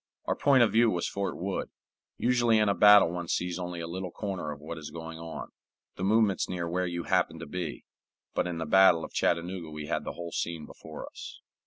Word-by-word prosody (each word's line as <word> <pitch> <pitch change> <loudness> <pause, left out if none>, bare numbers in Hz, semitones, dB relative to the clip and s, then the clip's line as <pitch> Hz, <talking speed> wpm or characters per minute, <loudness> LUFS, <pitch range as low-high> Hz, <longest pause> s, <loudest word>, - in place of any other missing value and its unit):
Our - - 0
point 135 -3 +5
of 115 - +2
view 115 +1 +5
was 90 -4 -1
Fort 100 -1 -3
Wood. 95 +3 -3 0.5
Usually 120 -2 +3
in 105 -1 +3
a - - +3
battle 105 -4 +7
one 85 -1 -4
sees 90 +1 -1
only 90 -1 -4
a 85 - -4
little 90 +2 -4
corner 95 -6 -4
of 70 - -8
what 80 +2 -7
is 75 - -7
going 80 0 -8
on, 80 0 -7 0.5
the 90 - -5
movements 105 0 +2
near 85 -2 -3
where 90 +2 -1
you 85 -1 -3
happen - - +1
to - - -7
be; 85 0 -5 0.5
but - - 0
in 85 -2 -4
the 80 - -3
battle 90 0 +5
of - - -12
Chattanooga 85 0 -1
we 75 -1 -6
had - - -2
the - - -5
whole 85 -1 -7
scene 85 -2 -3
before 80 -1 -9
us. - - -10
90 Hz, 220 wpm, -29 LUFS, 85-100 Hz, 0.5 s, battle